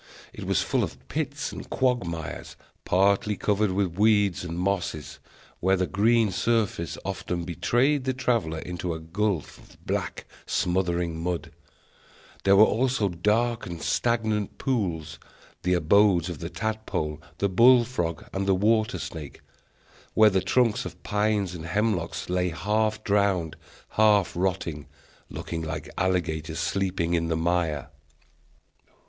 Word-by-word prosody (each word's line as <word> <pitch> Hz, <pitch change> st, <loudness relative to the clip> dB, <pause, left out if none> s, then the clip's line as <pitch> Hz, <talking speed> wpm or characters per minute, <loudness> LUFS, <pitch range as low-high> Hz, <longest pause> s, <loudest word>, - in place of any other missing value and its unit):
It -, -, -7 dB
was -, -, +1 dB
full -, -, +1 dB
of -, -, -4 dB
pits -, -, -3 dB
and -, -, -8 dB
quagmires, 90 Hz, -, -2 dB, 0.3 s
partly 100 Hz, +3 st, +2 dB
covered 105 Hz, +1 st, +1 dB
with 95 Hz, -2 st, -1 dB
weeds 105 Hz, -4 st, +3 dB
and 85 Hz, -1 st, -5 dB
mosses, 95 Hz, -4 st, -2 dB, 0.4 s
where 95 Hz, +2 st, +3 dB
the 90 Hz, -, +1 dB
green 110 Hz, +3 st, +3 dB
surface 105 Hz, -4 st, 0 dB
often 90 Hz, -2 st, -3 dB
betrayed 125 Hz, -, +1 dB
the 130 Hz, -, +1 dB
traveller 115 Hz, -11 st, 0 dB
into 90 Hz, 0 st, -4 dB
a -, -, -6 dB
gulf 90 Hz, +1 st, -2 dB
of -, -, -20 dB
black, -, -, -3 dB, 0.2 s
smothering 85 Hz, -2 st, 0 dB
mud; 85 Hz, -2 st, -3 dB, 0.9 s
there 100 Hz, 0 st, +6 dB
were 105 Hz, -, +8 dB
also 120 Hz, -2 st, +1 dB
dark 110 Hz, +7 st, 0 dB
and 85 Hz, -2 st, -6 dB
stagnant 110 Hz, -4 st, 0 dB
pools, 90 Hz, -, -2 dB, 0.4 s
the 90 Hz, 0 st, +2 dB
abodes 90 Hz, +1 st, +4 dB
of 85 Hz, -4 st, -6 dB
the 85 Hz, -, -5 dB
tadpole, 105 Hz, -10 st, -3 dB, 0.2 s
the 100 Hz, -, +1 dB
bull 120 Hz, +5 st, +6 dB
frog, 85 Hz, -, -3 dB
and 95 Hz, 0 st, -2 dB
the 95 Hz, -, +4 dB
water 110 Hz, +4 st, +2 dB
snake, 75 Hz, -4 st, -7 dB, 0.7 s
where 110 Hz, -1 st, +7 dB
the 95 Hz, -1 st, +2 dB
trunks 120 Hz, +4 st, +2 dB
of -, -, -9 dB
pines 105 Hz, -3 st, 0 dB
and 85 Hz, -2 st, -7 dB
hemlocks 90 Hz, -3 st, -1 dB
lay 90 Hz, 0 st, 0 dB
half 105 Hz, +6 st, 0 dB
drowned, 100 Hz, -6 st, +1 dB, 0.3 s
half 105 Hz, -4 st, +3 dB
rotting, 90 Hz, -5 st, -2 dB, 0.4 s
looking 80 Hz, -1 st, -5 dB
like 80 Hz, -1 st, -5 dB
alligators 85 Hz, -4 st, -1 dB
sleeping 95 Hz, -3 st, -1 dB
in 85 Hz, -1 st, +1 dB
the 80 Hz, -1 st, 0 dB
mire. 80 Hz, -4 st, 0 dB
95 Hz, 135 wpm, -26 LUFS, 85-110 Hz, 0.9 s, were